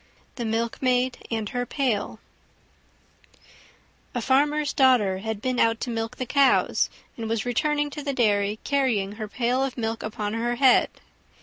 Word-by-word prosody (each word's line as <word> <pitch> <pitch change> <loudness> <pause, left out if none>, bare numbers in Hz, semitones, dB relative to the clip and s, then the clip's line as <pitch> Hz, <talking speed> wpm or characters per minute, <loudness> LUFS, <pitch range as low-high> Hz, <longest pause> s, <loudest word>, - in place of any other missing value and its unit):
THE 240 - -5
MILKMAID 245 +3 -1
AND 220 -3 -2
HER 245 -1 -2
PAIL 235 -7 -1 2.0
A - - 0
farmer's 290 +3 +2
daughter 240 -8 +3
had 220 0 -5
been 255 -1 0
out 225 0 +3
to 245 - -3
milk 225 +2 -4
the 255 - -3
cows, 280 +2 +3 0.3
and 225 -1 -5
was 225 -1 -1
returning 295 +4 0
to 295 - -6
the 285 -1 -2
dairy 210 -4 +1
carrying 250 -9 0
her 215 +1 -6
pail 245 +4 0
of 265 -2 -3
milk 225 -1 -2
upon 215 -1 -4
her 240 +1 -1
head. 260 0 +5
240 Hz, 150 wpm, -25 LUFS, 220-260 Hz, 2.0 s, head